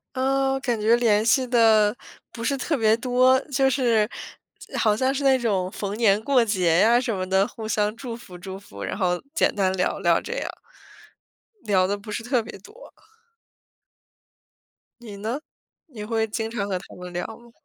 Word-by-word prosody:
呃 270 Hz, +1 st, +1 dB
感 240 Hz, -4 st, -1 dB
觉 225 Hz, +3 st, +4 dB
联 220 Hz, -3 st, +2 dB
系 255 Hz, +3 st, +3 dB
得 220 Hz, -3 st, +4 dB, 0.4 s
不 230 Hz, -, -8 dB
是 275 Hz, +4 st, 0 dB
特 295 Hz, +4 st, -1 dB
别 220 Hz, -3 st, +3 dB
多， 255 Hz, +2 st, +3 dB
就 270 Hz, +1 st, +3 dB
是 235 Hz, -5 st, +2 dB, 0.7 s
好 210 Hz, -2 st, +3 dB
像 260 Hz, +4 st, +1 dB
是 280 Hz, -, -2 dB
那 265 Hz, -1 st, +4 dB
种 195 Hz, -6 st, -1 dB
逢 200 Hz, 0 st, -5 dB
年 215 Hz, -3 st, +3 dB
过 260 Hz, -3 st, +3 dB
节 180 Hz, -6 st, +2 dB
呀 235 Hz, +4 st, +5 dB
什 240 Hz, -3 st, -2 dB
么 185 Hz, -1 st, -4 dB
的， 190 Hz, +1 st, +3 dB
互 220 Hz, 0 st, -8 dB
相 210 Hz, -1 st, 0 dB
祝 235 Hz, -2 st, -6 dB
福 185 Hz, -6 st, -12 dB
祝 190 Hz, +2 st, -8 dB
福， 100 Hz, -, -12 dB
然 -, -, -4 dB
后 180 Hz, -2 st, 0 dB
简 330 Hz, -, +2 dB
单 190 Hz, -2 st, +1 dB
聊 180 Hz, -1 st, -1 dB
聊 170 Hz, -1 st, +3 dB
这 465 Hz, -, -8 dB
样。 -, -, -3 dB, 1.1 s
聊 190 Hz, -3 st, +2 dB
得 200 Hz, -, -1 dB
不 210 Hz, +2 st, -10 dB
是 210 Hz, -, -4 dB
特 245 Hz, 0 st, 0 dB
别 215 Hz, -, -10 dB
多。 445 Hz, -, -15 dB, 2.1 s
你 210 Hz, -4 st, -9 dB
呢？ 225 Hz, +7 st, -4 dB, 0.5 s
你 235 Hz, -10 st, -9 dB
会 225 Hz, 0 st, 0 dB
经 225 Hz, +1 st, -3 dB
常 205 Hz, -3 st, -3 dB
和 190 Hz, -2 st, -1 dB
他 185 Hz, -, -14 dB
们 180 Hz, 0 st, -9 dB
聊 175 Hz, 0 st, -4 dB
吗？ 235 Hz, +1 st, -13 dB
220 Hz, 195 characters per minute, -24 LUFS, 200-245 Hz, 2.1 s, 呀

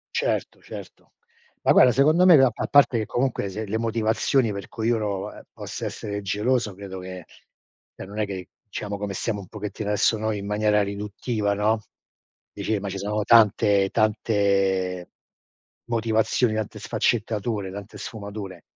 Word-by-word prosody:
Certo, -, -, -1 dB
certo. -, -, -11 dB, 0.5 s
Ma -, -, +3 dB
guarda 125 Hz, -, +7 dB
secondo 155 Hz, +8 st, +4 dB
me 180 Hz, -3 st, +9 dB
ga 135 Hz, -2 st, +6 dB
a -, -, -3 dB
parte 140 Hz, -4 st, +5 dB
che 110 Hz, -, -2 dB
comunque 120 Hz, -5 st, -1 dB
se 110 Hz, +3 st, -5 dB
le 110 Hz, +2 st, -2 dB
motivazioni 115 Hz, +1 st, +1 dB
per 100 Hz, -1 st, -6 dB
cui 115 Hz, -1 st, -2 dB
uno, 105 Hz, -4 st, -1 dB
ehm, -, -, -12 dB
possa -, -, -6 dB
essere 100 Hz, -1 st, -4 dB
geloso 105 Hz, +2 st, 0 dB
credo 95 Hz, -1 st, -8 dB
che 90 Hz, -2 st, -8 dB, 0.7 s
cioè -, -, -8 dB
non 100 Hz, +2 st, -10 dB
è 105 Hz, -, +2 dB
che 95 Hz, -2 st, -7 dB, 0.2 s
diciamo 100 Hz, 0 st, -4 dB
come 100 Hz, -1 st, -4 dB
stiamo 105 Hz, +2 st, -2 dB
un 95 Hz, -, -12 dB
pochettino 105 Hz, 0 st, -5 dB
adesso 105 Hz, +2 st, +2 dB
noi 110 Hz, -1 st, -1 dB
in 100 Hz, -, -6 dB
maniera 105 Hz, 0 st, +2 dB
riduttiva, 100 Hz, +1 st, -2 dB
no? 105 Hz, +2 st, +1 dB, 0.7 s
Dici 110 Hz, -2 st, -2 dB
ma 100 Hz, -, -4 dB
ci 95 Hz, -, -4 dB
sono 105 Hz, +2 st, -1 dB
tante 105 Hz, -3 st, +5 dB
tante 100 Hz, -4 st, +1 dB, 0.8 s
motivazioni, 115 Hz, 0 st, +1 dB
tante 110 Hz, -1 st, -4 dB
sfaccettature, 105 Hz, -3 st, -1 dB
tante 100 Hz, +2 st, -9 dB
sfumature. 100 Hz, -2 st, -7 dB
105 Hz, 155 wpm, -24 LUFS, 100-115 Hz, 0.8 s, me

